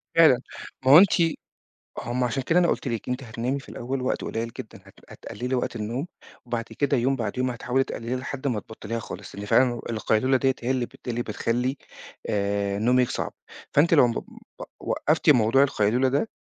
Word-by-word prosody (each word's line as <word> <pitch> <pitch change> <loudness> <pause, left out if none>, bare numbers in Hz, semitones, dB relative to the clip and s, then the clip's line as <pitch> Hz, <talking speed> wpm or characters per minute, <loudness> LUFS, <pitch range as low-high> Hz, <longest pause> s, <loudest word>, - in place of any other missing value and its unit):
فعلًا، 155 -7 +6 0.4
ما 130 - +5
هو 145 - +11
أنتِ 190 +2 +7 0.9
هُم 125 +1 -2
عشان 125 +2 -1
كده 165 +7 +3
أنا 175 - +3
قُلت - - -1
لِك 115 0 -3
أنتِ 125 +2 -2
هتنامي 120 +4 -3
في 135 - -14
الأول 130 +3 -4
وقت 130 - -1
قليّل 115 +1 -3
جدًا، - - -8
هت - - -17 0.2
هتقللي 125 +2 -5
وقت 125 - -2
النوم 120 +8 -3 0.4
وبعد 120 -1 -2 0.2
كده 140 -1 +2
يوم 130 +3 +1
بعد 120 -1 -4
يوم 130 0 0
هتحاولي 125 +2 0
تقلليها 120 -1 -4
لحد 135 +2 -5
ما 120 -5 0
تبطليها 115 +2 -6
خالص، - - -9
لأن 100 +1 -6
فعلًا 125 +4 +4
ال 120 - -8
القيلولة 115 +3 +2
ديّة 130 0 +1
هي 125 +2 0
اللي 130 -2 0
بت - - -18
اللي 120 0 -1
بتخلّي 120 +4 -1 0.5
آآ، 100 0 0
نومِك 125 +2 +3
صعب، - - -3 0.4
فأنتِ 160 +4 +4
لو 140 -6 +6
مب 115 - -3 0.4
وق - - -8
وقّفتِ 155 +1 +1
موضوع 125 0 +5
القيلولة 125 -1 +2
ده 140 +12 0
125 Hz, 195 wpm, -25 LUFS, 115-135 Hz, 0.9 s, هو